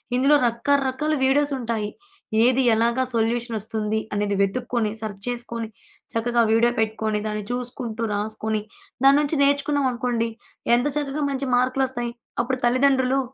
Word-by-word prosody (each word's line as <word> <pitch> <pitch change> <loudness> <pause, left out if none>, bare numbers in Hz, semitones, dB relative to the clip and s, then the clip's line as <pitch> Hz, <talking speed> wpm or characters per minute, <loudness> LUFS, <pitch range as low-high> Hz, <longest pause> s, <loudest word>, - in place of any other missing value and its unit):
ఇందులో 275 +4 +4
రకరకాల 275 +5 0
వీడియోసుంటాయి. 265 -6 +1 0.5
ఏది 255 +2 +4
ఎలాగా 235 +3 +2
సొల్యూషనొస్తుంది 225 -2 -1
అనేది 205 -1 0
వెతుక్కొని 230 +2 0
సర్చ్ 205 -3 -6
చేసుకొని 235 -2 -3 0.5
చక్కగా 235 +1 +1
వీడియో 235 +2 +4
పెట్టుకొని 220 -1 0
దాన్ని 210 -1 -3
చూసుకుంటూ 245 -2 -4
రాసుకొని 215 +1 -2 0.4
దాన్నుంచి 290 +2 +4
నేర్చుకున్నాం 285 0 +2
అనుకోండి, 235 -1 -1 0.5
ఎంత 245 +4 +1
చక్కగా 290 0 -2
మంచి 270 0 -2
మార్క్‌లోస్తాయి. 255 -1 0 0.3
అప్పుడు 255 +1 -2
తల్లిదండ్రులు 260 +1 +3
240 Hz, 110 wpm, -23 LUFS, 220-265 Hz, 0.5 s, ఇందులో